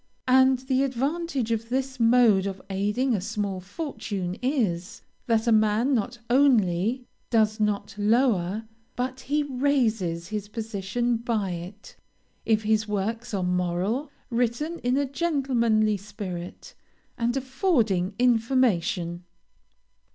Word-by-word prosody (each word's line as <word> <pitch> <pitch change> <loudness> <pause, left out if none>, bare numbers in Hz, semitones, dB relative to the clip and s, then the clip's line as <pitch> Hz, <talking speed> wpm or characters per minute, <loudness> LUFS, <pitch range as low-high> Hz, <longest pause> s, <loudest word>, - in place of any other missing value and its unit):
And 260 0 +5
the 260 +1 0
advantage 275 -1 -1
of 225 0 -2
this 265 0 -2
mode 230 -4 +5
of 195 -1 -5
aiding 210 +7 0
a 200 - 0
small 200 -2 -3
fortune 200 - -4
is, 225 - -1 0.2
that 225 -1 +2
a 235 - +3
man 215 +4 +3
not 235 0 -1
only 240 -3 +3 0.2
does 220 -2 +2
not 205 -1 -1
lower, 215 -3 +2 0.3
but 255 +1 -3
he 295 +3 0
raises 230 -11 0
his 210 -2 -4
position 225 +2 -2
by 225 -5 -1
it, 180 +5 -8 0.5
if 220 -1 +2
his 215 0 +1
works 225 +4 -2
are 190 - -1
moral, 180 - -1 0.2
written 245 +8 -1
in 250 +2 0
a 285 - +2
gentlemanly 255 -8 +1
spirit, 195 -3 -7 0.4
and 240 +2 0
affording 245 - +1
information. 225 -8 +1
225 Hz, 120 wpm, -26 LUFS, 200-255 Hz, 0.5 s, And